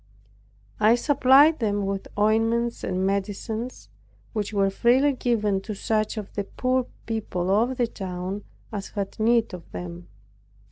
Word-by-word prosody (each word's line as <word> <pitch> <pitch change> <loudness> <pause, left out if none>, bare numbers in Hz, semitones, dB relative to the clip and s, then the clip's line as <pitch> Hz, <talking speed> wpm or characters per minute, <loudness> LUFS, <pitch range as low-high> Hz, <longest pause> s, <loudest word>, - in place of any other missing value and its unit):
I 215 +2 +6
supplied 280 +3 +5
them 205 -3 0
with 195 0 -3
ointments 225 +3 +1
and 185 +1 -1
medicines, 205 +5 -3 0.5
which 210 -2 -2
were 195 -2 +2
freely 255 +7 +3
given 215 -6 0
to 210 +1 -6
such 215 +2 -1
of 210 -2 -6
the 205 - -2
poor 255 +3 0 0.2
people 195 -5 -2
of 235 +6 +2
the 245 - +3
town 190 -1 -5 0.3
as 200 -1 -4
had 200 +1 -5
need 230 -1 +3
of 180 -2 -9
them. 175 0 -7
215 Hz, 140 wpm, -25 LUFS, 195-235 Hz, 0.5 s, I